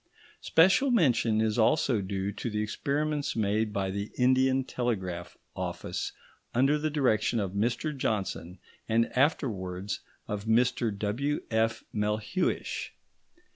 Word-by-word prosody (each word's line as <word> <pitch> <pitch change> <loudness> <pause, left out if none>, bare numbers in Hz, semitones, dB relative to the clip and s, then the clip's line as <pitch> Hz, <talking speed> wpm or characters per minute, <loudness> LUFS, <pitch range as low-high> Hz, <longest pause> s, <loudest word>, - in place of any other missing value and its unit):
Special 190 +11 +4
mention 120 - +3
is 110 +1 +1
also 125 -1 +3
due 95 +1 -2
to 115 +4 -4
the 105 -1 -1
experiments 145 +6 -1
made 105 0 +1
by 95 -2 -1
the 100 +2 -3
Indian 130 +1 +3
Telegraph 95 -10 -3 0.2
Office, - - -3 0.4
under 135 +5 +3
the 155 +1 0
direction 125 -6 +1
of 100 -3 -2
Mr 120 +9 -1
Johnson 95 -7 -2 0.3
and 115 +1 +1
afterwards 105 - 0 0.3
of 105 0 -4
Mr 115 +1 +2
W.F. 115 0 -1
Melhuish. 105 - -1
115 Hz, 115 wpm, -29 LUFS, 105-135 Hz, 0.4 s, Special